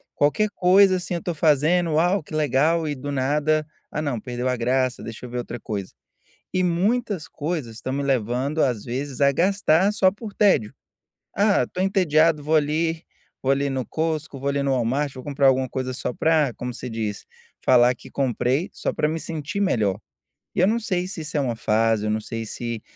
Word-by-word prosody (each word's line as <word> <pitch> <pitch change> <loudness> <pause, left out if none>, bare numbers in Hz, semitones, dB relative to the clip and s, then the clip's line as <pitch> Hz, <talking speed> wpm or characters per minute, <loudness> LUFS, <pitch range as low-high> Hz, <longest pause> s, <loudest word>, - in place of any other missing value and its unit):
qualquer 180 +9 +2
coisa 185 +1 +5
assim 180 0 -4
eu 170 - -1
estou 175 0 -4
fazendo, 160 +3 +3
"uau 175 +4 +2
que 155 - -13
legal", 155 +2 +2
e 145 - -2
do 140 +2 -5
nada, 150 +3 +1 0.3
"ah 150 - -2
não 140 -6 -2
perdeu 125 +2 -3
a 125 - +1
graça 125 +1 0
deixa 115 +2 -8
eu - - -11
ver 125 - -5
outra 120 0 -5
coisa", 100 -4 -5 0.6
e 185 - +2
muitas 185 +1 0
coisas 145 -7 -4
estão 130 +3 -4
me 140 - -1
levando 135 +3 0
às 120 -6 0
vezes 130 +2 -4
a 140 0 +5
gastar 185 +2 +3
só 190 -3 +4
por 210 +2 -9
tédio, 190 - +3 0.6
ah 205 0 +3
estou 185 - -4
entediado 165 -5 +3
vou 155 +2 0
ali 160 +2 0 0.4
vou 135 - +2
ali 140 +1 0
no 130 -2 -2
Costco, 155 -2 -2
vou 140 - -2
ali 140 0 0
no 140 -1 +1
Walmart, 130 +3 0
vou 130 - -8
comprar 140 -1 +1
alguma 130 -1 +3
coisa 130 +1 -3
só 125 -1 -3
para, 155 -2 +2
como 125 0 -5
você 125 +1 -6
diz, 110 -3 -4 0.4
falar 125 0 +5
que - - -15
comprei, 135 - 0
só - - -3
para - - 0
me 160 +1 -2
sentir 160 +5 -4
melhor, 105 - +1 0.6
e - - +2
eu 185 - +5
não 225 +3 +2
sei 185 -5 -1
se 185 -3 -6
isso 155 +1 -7
é - - +3
uma 125 -4 -1
fase, 110 0 +1
eu - - 0
não 110 0 -1
sei 115 +1 -5
se 115 0 -5
145 Hz, 205 wpm, -23 LUFS, 125-165 Hz, 0.6 s, coisa